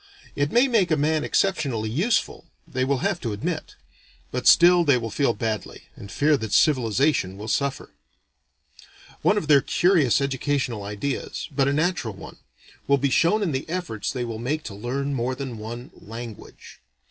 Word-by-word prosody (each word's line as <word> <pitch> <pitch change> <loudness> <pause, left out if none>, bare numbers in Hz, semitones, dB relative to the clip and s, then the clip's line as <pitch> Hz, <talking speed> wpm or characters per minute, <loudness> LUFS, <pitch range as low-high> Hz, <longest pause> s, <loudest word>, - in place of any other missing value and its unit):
It 145 +1 0
may 245 +3 +4
make 220 -8 +2
a 155 - +2
man 155 +1 +1
exceptionally 135 - 0
useful, 185 - 0 0.2
they 130 - -2
will 135 +2 0
have 195 -3 -1
to 115 -4 -3
admit; 100 - -4 0.6
but 125 0 -2
still 175 0 +7
they 140 -5 +4
will 115 -2 -4
feel 135 -1 +1
badly, 110 -2 -4
and 100 - -11
fear 150 0 +2
that 110 -4 -5
civilization 125 -6 +2
will 105 +2 -7
suffer. 140 +3 -2 1.3
One 210 - +3
of 195 - -2
their 145 -3 +6
curious 155 - +3
educational 135 -4 -1
ideas 105 +12 -4
but 135 -1 +1
a - - +2
natural 155 - -1
one - - -11 0.5
will 140 - +4
be 140 0 0
shown 195 - +3
in 175 - 0
the 135 +3 -4
efforts 165 - -3
they 125 -2 -3
will 115 -2 -5
make 145 +6 -2
to 105 - -7
learn 130 +7 -3
more 130 0 -1
than 130 -4 -6
one 120 +4 -7
"language." 115 0 -11
135 Hz, 170 wpm, -24 LUFS, 115-155 Hz, 1.3 s, still